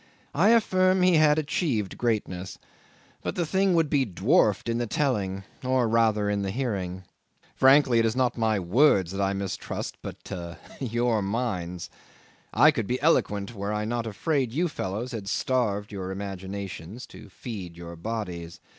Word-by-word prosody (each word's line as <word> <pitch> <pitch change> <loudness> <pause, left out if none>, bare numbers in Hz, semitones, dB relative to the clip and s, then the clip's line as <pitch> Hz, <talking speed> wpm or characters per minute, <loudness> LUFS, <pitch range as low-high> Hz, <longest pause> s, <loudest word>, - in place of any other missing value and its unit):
I 180 +8 +4
affirm 185 -5 +4
he 180 -2 +5
had 150 -1 +5
achieved 140 - -1
greatness; 100 -6 -2 0.6
but - - -3
the 175 - 0
thing 190 +2 +2
would 165 -2 +3
be 140 -2 +2
dwarfed 105 - +2
in 115 0 0
the 120 - -1
telling, 100 -8 -1 0.2
or 130 -2 +2
rather 110 -2 +2
in 105 0 0
the 100 - -2
hearing. 95 -6 -3 0.5
Frankly, 130 -3 +5
it 115 - +3
is 110 - -1
not 130 -1 +1
my 110 -2 +1
words 95 - +3
that 100 +1 -3
I 100 0 +1
mistrust 100 -1 -4
but - - -9 0.5
your 120 -3 0
minds. 95 -5 -3 0.6
I 155 - +6
could 115 -9 -3
be 125 +1 -1
eloquent 105 -9 +1
were 100 -1 -4
I 105 0 -1
not 115 +1 -2
afraid 130 +4 -1
you 170 +8 +1
fellows 115 - -4
had 110 -5 -6
starved 105 -3 0
your 95 -2 -5
imaginations 95 +1 -6
to - - -13
feed 95 -8 -7
your 85 0 -8
bodies. 85 -3 -5
110 Hz, 160 wpm, -26 LUFS, 95-130 Hz, 0.6 s, I